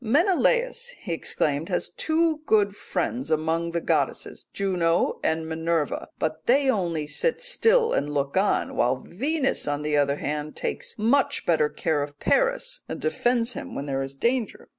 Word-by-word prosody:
"'Menelaus,' 470 Hz, -, +2 dB
he 175 Hz, -, -5 dB
exclaimed, 155 Hz, 0 st, -1 dB
'has 180 Hz, -, -1 dB
two 320 Hz, 0 st, +1 dB
good 205 Hz, -2 st, +3 dB
friends 135 Hz, -, -3 dB
among 160 Hz, +2 st, 0 dB
the 170 Hz, 0 st, -1 dB
goddesses, -, -, -1 dB
Juno 180 Hz, -4 st, +1 dB
and 160 Hz, 0 st, 0 dB
Minerva, 160 Hz, -1 st, -1 dB
but 160 Hz, 0 st, -3 dB
they 270 Hz, +2 st, +4 dB
only 170 Hz, -8 st, -1 dB
sit 475 Hz, -, 0 dB
still 485 Hz, -1 st, +3 dB
and 145 Hz, +1 st, 0 dB
look 140 Hz, -1 st, -1 dB
on, 195 Hz, +2 st, +1 dB
while 125 Hz, +2 st, +2 dB
Venus 270 Hz, -, -1 dB
on 145 Hz, 0 st, -1 dB
the 150 Hz, 0 st, 0 dB
other 140 Hz, -1 st, +2 dB
hand 150 Hz, +1 st, -4 dB
takes -, -, -4 dB
much 280 Hz, +6 st, +2 dB
better 155 Hz, -3 st, +3 dB
care 155 Hz, -1 st, -1 dB
of 145 Hz, 0 st, -6 dB
Paris, -, -, +1 dB
and -, -, -4 dB
defends 245 Hz, -, +1 dB
him -, -, -7 dB
when 140 Hz, -, -4 dB
he -, -, -2 dB
is 135 Hz, 0 st, -3 dB
in -, -, -30 dB
danger. 240 Hz, -2 st, -1 dB
175 Hz, 165 wpm, -25 LUFS, -, -, they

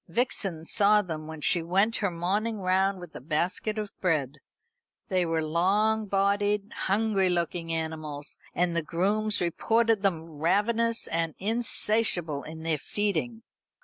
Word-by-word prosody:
Vixen 195 Hz, -9 st, -1 dB
saw 210 Hz, +2 st, +4 dB
them 155 Hz, -4 st, -6 dB
when 160 Hz, -1 st, -8 dB
she 170 Hz, +3 st, +4 dB
went 195 Hz, +7 st, +2 dB
her 200 Hz, -, 0 dB
morning 200 Hz, +6 st, -1 dB
round 190 Hz, +1 st, +1 dB
with 175 Hz, -3 st, -11 dB
a -, -, -7 dB
basket 175 Hz, -, -1 dB
of 210 Hz, -2 st, -4 dB
bread. 150 Hz, -6 st, 0 dB, 0.7 s
They 180 Hz, -2 st, +1 dB
were 165 Hz, -1 st, 0 dB
long 205 Hz, +7 st, +1 dB
bodied, 200 Hz, +1 st, +1 dB
hungry 200 Hz, -1 st, +1 dB
looking 170 Hz, -1 st, -1 dB
animals; 155 Hz, -3 st, -4 dB, 0.2 s
and 175 Hz, -1 st, +1 dB
the 170 Hz, -, +1 dB
grooms 205 Hz, +7 st, 0 dB
reported 225 Hz, +5 st, +2 dB
them 180 Hz, -5 st, 0 dB
ravenous 210 Hz, +9 st, 0 dB
and 165 Hz, -2 st, -2 dB
insatiable 210 Hz, -7 st, +1 dB
in 160 Hz, +2 st, -9 dB
their 160 Hz, -2 st, 0 dB
feeding. 210 Hz, -, -2 dB
185 Hz, 140 wpm, -27 LUFS, 165-210 Hz, 0.7 s, saw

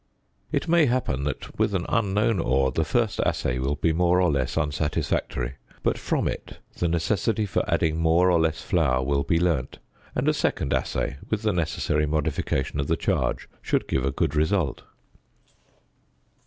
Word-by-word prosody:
It -, -, -1 dB
may 165 Hz, -2 st, +4 dB
happen 120 Hz, -, 0 dB
that 75 Hz, -, -5 dB
with 100 Hz, -, +2 dB
an 90 Hz, -2 st, -1 dB
unknown 105 Hz, -1 st, +1 dB
ore 65 Hz, -3 st, +2 dB
the 80 Hz, +6 st, 0 dB
first 110 Hz, +6 st, 0 dB
assay 65 Hz, 0 st, 0 dB
will 70 Hz, +3 st, 0 dB
be 80 Hz, +3 st, +1 dB
more 90 Hz, +2 st, +3 dB
or 90 Hz, -3 st, +3 dB
less 65 Hz, -3 st, -1 dB
unsatisfactory: 70 Hz, -3 st, -1 dB, 0.3 s
but -, -, +2 dB
from -, -, -1 dB
it -, -, -5 dB, 0.2 s
the 85 Hz, -, +2 dB
necessity 100 Hz, +6 st, 0 dB
for 95 Hz, -, 0 dB
adding 80 Hz, 0 st, +1 dB
more 85 Hz, +3 st, +4 dB
or 85 Hz, -, +4 dB
less 80 Hz, -1 st, 0 dB
flour 70 Hz, -7 st, +1 dB
will 70 Hz, +1 st, +1 dB
be 80 Hz, +3 st, +1 dB
learnt, 80 Hz, -7 st, 0 dB, 0.4 s
and -, -, 0 dB
a -, -, +4 dB
second 70 Hz, -, 0 dB
assay, 70 Hz, -, -1 dB
with 110 Hz, 0 st, -1 dB
the 105 Hz, -2 st, +2 dB
necessary 80 Hz, -3 st, 0 dB
modification 75 Hz, -2 st, -1 dB
of 70 Hz, -, -1 dB
the -, -, +1 dB
charge, -, -, -1 dB
should -, -, 0 dB
give 65 Hz, -, 0 dB
a 70 Hz, -, +1 dB
good 70 Hz, +2 st, -1 dB
result. 80 Hz, -1 st, +1 dB
80 Hz, 170 wpm, -25 LUFS, 70-90 Hz, 0.4 s, may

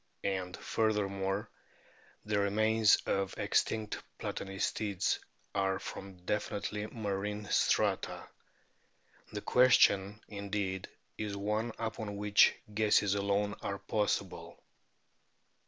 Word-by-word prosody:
And, 95 Hz, -2 st, -2 dB
furthermore, 100 Hz, -1 st, 0 dB, 0.8 s
the 105 Hz, -1 st, +1 dB
remains 110 Hz, +2 st, +4 dB
of 95 Hz, 0 st, 0 dB
extinct 110 Hz, -1 st, 0 dB, 0.2 s
Platanistids 100 Hz, 0 st, -1 dB, 0.3 s
are 95 Hz, -1 st, +1 dB
from 95 Hz, -1 st, -8 dB
definitely 105 Hz, +1 st, -2 dB
marine 105 Hz, -1 st, -3 dB
strata. -, -, +1 dB, 1.0 s
The -, -, -4 dB
question, 105 Hz, -5 st, +4 dB
indeed, 100 Hz, -2 st, -3 dB, 0.3 s
is 105 Hz, -2 st, -3 dB
one 105 Hz, +3 st, -1 dB
upon 110 Hz, -2 st, -4 dB
which 105 Hz, 0 st, +5 dB, 0.2 s
guesses 105 Hz, -2 st, +3 dB
alone 100 Hz, 0 st, +1 dB
are 100 Hz, -, -3 dB
possible. 100 Hz, -2 st, -2 dB
100 Hz, 90 wpm, -32 LUFS, 100-105 Hz, 1.0 s, which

